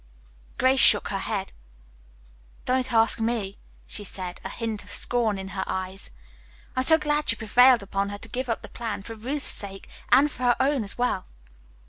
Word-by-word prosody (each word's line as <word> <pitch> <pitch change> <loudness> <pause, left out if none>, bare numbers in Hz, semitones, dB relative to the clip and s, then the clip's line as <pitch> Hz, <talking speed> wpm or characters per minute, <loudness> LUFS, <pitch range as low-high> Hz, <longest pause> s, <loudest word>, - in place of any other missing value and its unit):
Grace 260 +1 +3
shook 205 - +6
her 195 - -2
head. 195 -1 -4 1.1
"Don't 255 0 0
ask 225 -1 +3
me," 225 -4 -2 0.3
she 210 - -6
said, 185 -2 -6
a 190 - -5
hint 225 -1 -4
of - - -16
scorn 230 -4 0
in 190 0 -6
her 190 0 -3
eyes. 190 +1 -5 0.7
"I - - 0
am - - +2
so 320 +2 +7
glad 300 -1 -1
you - - +2
prevailed 245 +1 +5
upon 200 0 -2
her 205 - -6
to 225 - -8
give 250 +3 -4
up 230 - -2
the - - -8
plan, 225 -4 -5
for 225 - -8
Ruth's 260 +7 -4
sake 195 -1 -1 0.2
and 280 +4 +5
for 255 - -11
her 245 -1 +3
own 270 -2 +1
as 200 - -4
well." 245 - -1
225 Hz, 190 wpm, -25 LUFS, 200-255 Hz, 1.1 s, so